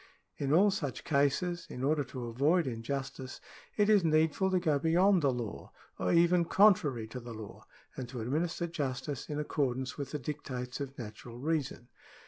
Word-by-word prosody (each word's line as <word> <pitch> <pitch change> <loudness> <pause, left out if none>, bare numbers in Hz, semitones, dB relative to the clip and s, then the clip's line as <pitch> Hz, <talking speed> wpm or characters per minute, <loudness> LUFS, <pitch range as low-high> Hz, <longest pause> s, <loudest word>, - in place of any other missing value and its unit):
In 140 -1 -1
all 195 +6 +5
such 145 - -3
cases 155 +5 +1
in 125 - -6
order 145 +1 +2
to 125 0 -6
avoid 145 +9 +2
in 115 -4 -4
justice, 135 +1 -5 0.4
it 205 -1 +4
is 210 -3 +5
needful 160 +3 +2
to 185 -1 +2
go 155 -5 +1
beyond 175 +5 +4
the 140 -2 +3
law, 120 -4 -6 0.3
or - - +1
even 170 +1 +5
contrary 165 - +4
to 125 - -6
the 120 -1 -8
law, 110 -2 -10 0.3
and 125 -2 -6
to 125 -1 -6
administer 160 +9 -1
justice 140 -4 -4
in 150 - -3
accordance 130 -3 -2
with 140 - -4
the 150 - -3
dictates 130 -3 -5
of 135 0 -6
natural 115 +1 -8
reason. 140 -4 -2
145 Hz, 175 wpm, -31 LUFS, 125-165 Hz, 0.4 s, all